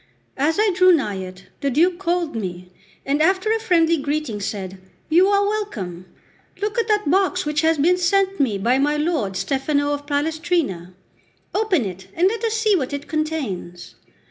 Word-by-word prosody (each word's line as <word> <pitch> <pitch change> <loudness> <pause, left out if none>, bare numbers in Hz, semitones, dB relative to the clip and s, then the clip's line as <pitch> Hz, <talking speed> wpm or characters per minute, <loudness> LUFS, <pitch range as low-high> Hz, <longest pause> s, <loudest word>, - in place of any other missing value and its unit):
As 305 +4 +1
I 430 -1 +3
drew 365 +1 +5
nigh 240 - +1
it, 185 0 -9
the 280 - 0
Duke 345 +6 +2
called 345 -5 -1
me, 180 -4 -5 0.3
and 285 +2 0
after 375 +6 +2
a 450 - +1
friendly 335 -6 +3
greeting 285 -6 -2
said: 195 -2 -5 0.3
"You 350 +4 +5
are 405 0 +3
welcome! 200 - -4 0.5
Look 420 +4 -1
at 460 - 0
that 420 -5 +1
box 375 -1 +1
which 300 +1 0
has 320 0 +2
been 350 +5 +3
sent 390 +2 +1
me 240 -8 +1
by 240 +7 +1
my 295 +2 +1
lord 295 - -1
Stefano 285 +5 0
of 290 0 -6
Palestrina. 290 - -1 0.6
Open 400 - +1
it, 190 0 -7
and 350 +3 +3
let 455 +2 -4
us 450 -1 0
see 435 -2 +3
what 285 -5 -2
it 285 +1 -5
contains." 275 - -4
310 Hz, 175 wpm, -21 LUFS, 235-370 Hz, 0.6 s, drew